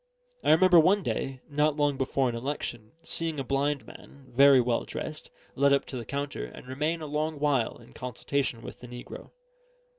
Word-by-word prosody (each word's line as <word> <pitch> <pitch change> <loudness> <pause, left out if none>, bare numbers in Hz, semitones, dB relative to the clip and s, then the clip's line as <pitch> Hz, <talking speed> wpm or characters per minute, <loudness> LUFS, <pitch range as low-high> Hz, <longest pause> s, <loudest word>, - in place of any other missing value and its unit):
I - - +1
remember 175 +2 +7
one 190 +5 +4
day, 135 -4 -3
not 150 0 +1
long 145 -1 +2
before 135 0 0
an 120 - -1
election, 120 -3 -5
seeing 165 -2 -1
a - - -1
blind 140 +2 0
man, 140 -1 -14
very 140 0 +7
well 120 -1 +1
dressed, 155 0 -6 0.2
led 140 +1 +4
up 140 - +2
to - - -8
the 120 -2 -5
counter 140 - -3
and - - -11
remain 150 +6 -2
a - - -4
long 155 +1 -2
while 140 -5 +1
in 65 - -17
consultation 125 - -3
with - - -9
the 125 - -10
negro. 120 0 -9
140 Hz, 185 wpm, -28 LUFS, 125-150 Hz, 0.2 s, remember